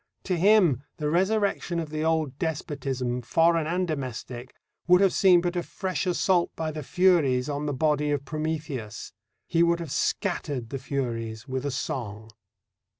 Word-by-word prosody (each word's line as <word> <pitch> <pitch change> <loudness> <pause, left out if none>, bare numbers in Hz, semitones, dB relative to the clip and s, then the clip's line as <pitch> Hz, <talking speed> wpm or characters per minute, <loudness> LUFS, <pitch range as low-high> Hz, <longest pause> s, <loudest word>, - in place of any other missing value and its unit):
To 185 - -1
him 175 - +4 0.2
the 150 -1 -1
resurrection 190 -1 +1
of 160 -2 -5
the 155 0 -2
old 160 -4 0
despotism, 135 -6 -2
foreign 165 +5 +2
and 180 +2 0
domestic, 130 -4 -5 0.3
would 180 0 +6
have 195 -1 +4
seemed 180 -3 +5
but 175 0 -1
a 175 - 0
fresh 185 +1 -3
assault 180 0 +2
by 160 -1 -2
the 155 0 -5
Furies 155 -6 +3
on 145 0 -3
the - - 0
body 150 +1 +1
of 145 -1 -1
Prometheus. 150 -8 -4 0.3
He 170 - +1
would 170 0 +3
have 165 -5 -6
scattered 145 - -2
the 135 - -3
Furies 115 -5 -4
with 130 +1 -3
a - - 0
song. 110 -5 -4
155 Hz, 160 wpm, -26 LUFS, 130-175 Hz, 0.3 s, would